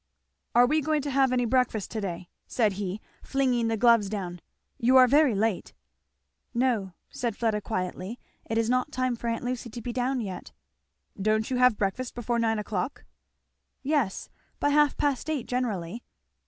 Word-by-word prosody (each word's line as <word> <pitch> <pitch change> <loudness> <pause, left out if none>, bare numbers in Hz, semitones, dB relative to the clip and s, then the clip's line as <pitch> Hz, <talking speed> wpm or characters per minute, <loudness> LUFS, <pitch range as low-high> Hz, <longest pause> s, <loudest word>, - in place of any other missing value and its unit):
"Are 245 +1 +7
we 305 +5 +2
going 305 -1 0
to 285 - -3
have 270 -1 +3
any 245 -1 +2
breakfast 240 -4 0
to 220 - -3
day?" 180 -2 -5 0.2
said 215 -5 +1
he 195 +1 -4 0.2
flinging 255 -4 +1
the 225 0 0
gloves 230 -3 +4
down. 180 -4 -5 0.4
"You 255 +3 +5
are 255 - +9
very 280 -2 +4
late!" 210 -1 -1 0.8
"No," 235 -7 +1 0.2
said 235 -4 -3
Fleda 220 -3 0
quietly, 185 +2 -4 0.3
"it 225 - 0
is 230 -1 +2
not 255 +4 +1
time 255 -3 0
for 235 - -6
aunt 230 +1 -2
Lucy 245 -1 -3
to 235 - -7
be 240 +1 -5
down 255 +2 0
yet." 195 -5 -6 0.7
"Don't 215 +3 +1
you 255 - +1
have 250 -3 +4
breakfast 225 +6 -2
before 240 0 -1
nine 225 -1 +1
o'clock?" 210 +3 -3 0.8
"Yes 275 -8 -1 0.3
by 290 - +2
half 295 0 +3
past 285 +1 0
eight 295 -7 -1
generally." 230 -4 -3
235 Hz, 170 wpm, -27 LUFS, 210-255 Hz, 0.8 s, are